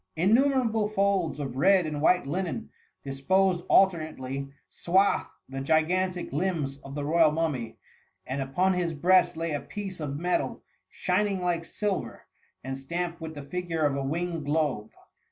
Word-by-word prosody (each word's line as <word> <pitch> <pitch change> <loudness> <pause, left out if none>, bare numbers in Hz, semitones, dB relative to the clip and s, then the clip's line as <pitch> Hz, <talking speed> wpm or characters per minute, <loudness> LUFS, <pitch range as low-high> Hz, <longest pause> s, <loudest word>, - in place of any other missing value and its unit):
Innumerable 225 - +3
folds 195 -6 +1
of 135 -4 -4
red 190 +4 +4
and 150 -2 -3
white 180 +2 +4
linen, 185 +8 -3 0.3
disposed 175 +7 +1
alternately, 155 -7 +2 0.2
swadied 190 +3 +2 0.2
the 135 0 -5
gigantic 175 +5 +1
limbs 150 -4 -1
of 135 0 -10
the 145 -1 -3
royal 160 +1 +5
mummy; 150 -8 -2 0.5
and 135 +2 -3
upon 180 +8 +1
his 175 -3 -1
breast 175 +2 +4
lay 165 0 -2
a 145 - -2
piece 195 -4 -6
of 145 -2 -3
metal, 175 +3 -1 0.3
shimng 195 +1 0
like 175 -2 0
silver, 200 +3 -3 0.4
and 135 +1 -4
stamped 170 +4 -4
with 160 -1 -6
the 145 - -7
figure 165 +1 -2
of 145 -2 +1
a 140 - -2
winged 165 +3 -2
globe. 145 -7 0
165 Hz, 150 wpm, -27 LUFS, 145-185 Hz, 0.5 s, royal